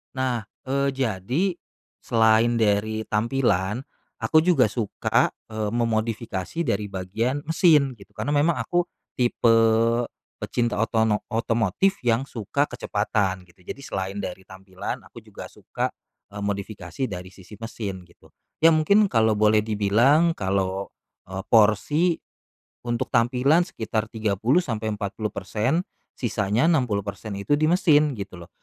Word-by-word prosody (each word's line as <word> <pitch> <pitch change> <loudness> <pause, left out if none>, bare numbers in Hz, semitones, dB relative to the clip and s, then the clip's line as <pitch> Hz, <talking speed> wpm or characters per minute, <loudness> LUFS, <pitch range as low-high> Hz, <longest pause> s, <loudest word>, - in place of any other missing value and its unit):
Nah, 130 -3 0 0.2
eee, 140 +1 +1
jadi 125 - -1 0.6
selain 115 0 +3
dari 110 0 +1
tampilan, 110 -1 0 0.3
aku 155 - +3
juga 175 -5 +4
suka, 110 0 0 0.2
eee, 110 -1 -2
memodifikasi 115 - -2
dari 105 0 -1
bagian 110 +9 -2
mesin 155 -4 +4
gitu. 100 -4 -16
Karena 125 +8 -1
memang 150 +3 +2
aku 175 0 0 0.3
tipe 120 -2 +2 0.9
pecinta 120 -3 -1
otono 110 -1 +1
otomotif 115 - +1
yang 120 +1 +2
suka 130 +1 -2
kecepatan 100 -7 -1
gitu, 90 +1 -24
jadi 90 - -7
selain 95 -1 -4
dari 95 +1 -7
tampilan, 95 0 -7
aku - - -12
juga - - -10
suka, - - -4 0.4
eee, 100 - -6
modifikasi 100 +1 -4
dari 90 -4 -6
sisi 95 +2 -15
mesin 105 -4 -5
gitu. 85 - -23 0.3
Ya 165 0 +8
mungkin 200 +7 +4
kalau 110 -2 +3
boleh 105 0 +4
dibilang, 115 +10 +3
kalo, 95 -2 -1 0.4
eee, 95 +1 -5
porsi 135 - +4 0.7
untuk 120 0 -1
tampilan 125 +8 +3
sekitar 110 - -3
30-40%, 110 - -1 0.3
sisanya 110 - 0
60% 105 - -1
itu 100 +9 -1
di 150 +2 +3
mesin, 150 -4 +4
gitu 95 -3 -7
loh. 85 - -12
110 Hz, 120 wpm, -24 LUFS, 100-135 Hz, 0.9 s, Ya